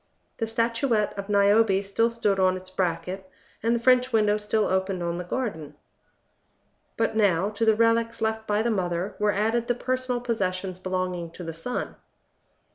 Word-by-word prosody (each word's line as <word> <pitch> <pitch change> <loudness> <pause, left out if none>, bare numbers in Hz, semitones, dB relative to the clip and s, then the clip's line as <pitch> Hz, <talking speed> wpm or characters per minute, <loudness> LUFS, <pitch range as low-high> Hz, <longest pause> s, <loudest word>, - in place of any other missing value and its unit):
The 225 - -2
statuette 230 -1 0
of 200 0 -6
Niobe 200 0 +4
still 215 +4 +1
stood 210 -4 0
on 185 0 +3
its 185 0 -10
bracket, 185 +1 -2 0.3
and 230 +2 +2
the - - 0
French 255 +1 +4
window 210 -2 +3
still 210 0 0
opened 190 -1 -1
on 170 0 -2
the - - -3
garden. 180 - -4 1.2
But 225 -1 0
now, 200 -2 +2
to 225 +2 -1
the 220 -1 +5
relics 230 +1 +2
left 220 0 -1
by 210 +1 +1
the 235 - +1
mother, 180 -1 -2
were 210 0 +3
added 225 +4 0
the 245 - +1
personal 255 0 -1
possessions 190 -6 -2
belonging 185 -2 -3
to 180 - -8
the 165 -1 -5
son. 165 +10 -4
210 Hz, 170 wpm, -26 LUFS, 185-230 Hz, 1.2 s, the